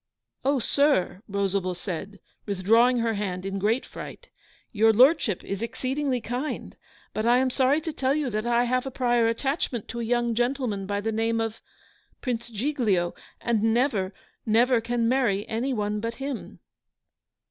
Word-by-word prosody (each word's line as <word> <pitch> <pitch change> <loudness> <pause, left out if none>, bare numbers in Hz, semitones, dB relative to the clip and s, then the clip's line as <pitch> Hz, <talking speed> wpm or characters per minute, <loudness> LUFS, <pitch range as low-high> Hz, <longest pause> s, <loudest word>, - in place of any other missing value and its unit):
'Oh, 280 +1 +2
sir!' 270 -6 +2
Rosalba 195 -2 -1
said, 190 +2 -6 0.3
withdrawing 225 +6 +4
her 230 -1 +1
hand 190 -3 -3
in 195 0 -3
great 220 +6 +1
fright. - - -9 0.4
'Your 225 +1 +4
Lordship 245 - +4
is 200 +1 -4
exceedingly 255 +3 -1
kind; 245 +6 -4 0.4
but 215 +2 -1
I 240 +1 +6
am 260 0 +2
sorry 265 +4 +2
to 320 -1 -4
tell 270 0 +1
you 295 -5 -1
that 215 +2 -2
I 240 0 +3
have 255 +2 0
a - - -1
prior 240 -3 +2
attachment 245 -1 -1
to 235 - -5
a - - -2
young 240 0 +1
gentleman 240 -5 -1
by 205 0 -1
the 225 +2 -1
name 225 +1 0
of 225 0 -3 0.6
Prince 240 -2 -3
Giglio 215 -7 0 0.3
and 230 -3 0
never 225 -4 +1 0.3
never 235 +2 +3
can 235 0 0
marry 230 -5 +1
any 235 +5 -1
one 210 -3 -1
but 230 +2 -3
him. 275 -2 -6
230 Hz, 160 wpm, -26 LUFS, 210-255 Hz, 0.6 s, I